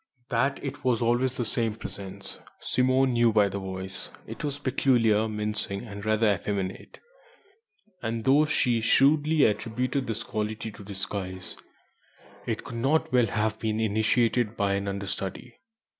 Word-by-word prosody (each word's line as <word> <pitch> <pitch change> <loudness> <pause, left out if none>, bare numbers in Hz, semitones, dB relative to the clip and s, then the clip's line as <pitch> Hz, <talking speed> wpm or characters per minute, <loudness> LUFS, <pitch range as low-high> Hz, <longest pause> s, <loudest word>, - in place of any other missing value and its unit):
That 135 +3 +1
it 145 0 -5
was 125 -3 +2
always 120 +2 +1
the 120 - -1
same 115 -1 +1
Presence, 100 -4 -4 0.2
Simone 130 +1 +2
knew 120 -1 +4
by 105 -2 +4
the 100 +1 -4
voice. 95 0 -5 0.2
It - - -8
was 145 -1 -1
peculiar, 115 -6 +2
mincing, 105 -1 -3
and 100 -3 -8
rather 110 0 +3
effeminate, 95 0 -4 1.0
and 115 0 -2
though 140 +5 +5
she 120 -6 +1
shrewdly 145 +5 +4
attributed 125 +5 -1
this 115 -2 -2
quality 110 +1 -3
to 105 - -12
disguise, 95 -1 -4 0.9
it - - -2
could 115 - -7
not 135 +3 +1
well 125 -2 +4
have 110 +1 -1
been 110 -1 -1
imitated 110 +1 +1
by 100 -1 +1
an 100 0 -1
understudy. 100 +4 -4
110 Hz, 145 wpm, -27 LUFS, 100-125 Hz, 1.0 s, though